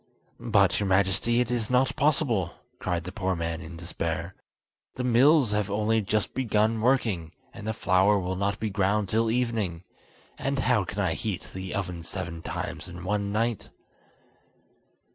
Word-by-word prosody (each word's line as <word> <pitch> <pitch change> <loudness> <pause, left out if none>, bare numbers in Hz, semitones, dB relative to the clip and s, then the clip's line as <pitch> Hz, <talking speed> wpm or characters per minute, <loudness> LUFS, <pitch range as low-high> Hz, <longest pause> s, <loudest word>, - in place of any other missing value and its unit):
"But, - - +3
your 100 - 0
Majesty, 95 +5 +3
it 125 -1 -1
is 115 -3 -1
not 125 +1 +2
possible," 140 - +1 0.2
cried 90 -2 -1
the 90 - -6
poor 95 -2 -1
man 85 0 -3
in 85 0 -9
despair. 85 +1 -3 0.6
"The 125 - -3
mills 125 +1 +5
have 105 -1 0
only 110 +2 +1
just 105 0 -1
begun 110 -3 +1
working, 110 -10 +1 0.2
and 105 - -8
the - - +1
flour 100 +1 +3
will 95 -1 -2
not 100 +1 -1
be 110 -2 -2
ground 100 +1 +1
till 110 +2 +2
evening, 110 -8 -1 0.6
and 140 +1 -1
how 125 -6 +2
can 105 - -7
I 95 -5 +1
heat 105 -1 -3
the 95 +2 -5
oven 90 -4 -3
seven 85 -1 -6
times 90 - -5
in 90 0 -9
one 100 +1 -1
night?" 115 +1 -1
100 Hz, 160 wpm, -27 LUFS, 90-115 Hz, 0.6 s, mills